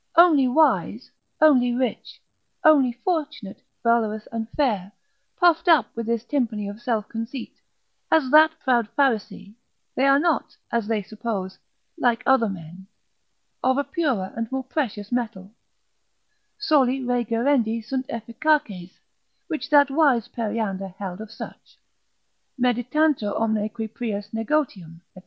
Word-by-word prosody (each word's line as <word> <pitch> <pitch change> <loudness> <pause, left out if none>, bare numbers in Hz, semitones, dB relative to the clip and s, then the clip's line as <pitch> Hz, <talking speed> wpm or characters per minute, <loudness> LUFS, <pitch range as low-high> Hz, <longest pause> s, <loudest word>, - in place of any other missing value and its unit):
Only 320 -6 +6
wise, 250 - +1 0.3
only 250 -6 +5
rich, 250 -2 -3 0.4
only 285 -5 +5
fortunate, 295 - -3 0.2
valorous, 220 -2 +1
and 225 -1 -4
fair, 215 -9 -1 0.5
puffed 345 -1 +3
up 305 -10 +4
with 230 -1 -4
this 230 -1 -1
tympany 230 -7 -1
of 205 +3 -8
self 225 -5 -1
conceit; 230 +2 -6 0.6
as 295 -5 +2
that 310 +1 +8
proud 240 -4 +2
Pharisee, 225 -6 0 0.4
they 270 - +2
are 275 0 +6
not 320 0 0
(as 235 -3 -1
they 215 -2 -1
suppose) 200 -2 -5 0.4
like 240 -5 +1
other 265 -5 +3
men, 180 0 -9 0.8
of 260 +1 +2
a 285 - +1
purer 275 - -2
and 230 +1 -4
more 265 0 -2
precious 235 -7 -3
metal: 220 -6 -3 1.1
Soli 270 -10 +2
rei 245 -1 0
gerendi 230 0 +1
sunt 255 +3 -4
efficaces, 230 - -1 0.5
which 310 - -4
that 285 -2 +5
wise 270 -6 +3
Periander 215 -5 -3
held 190 0 -6
of 220 - -8
such: 225 - -11 0.8
meditantur 250 0 +1
omne 220 -1 0
qui 220 0 -5
prius 210 -2 -5
negotium, 225 - -2
&c. - - -13
235 Hz, 130 wpm, -23 LUFS, 215-275 Hz, 1.1 s, that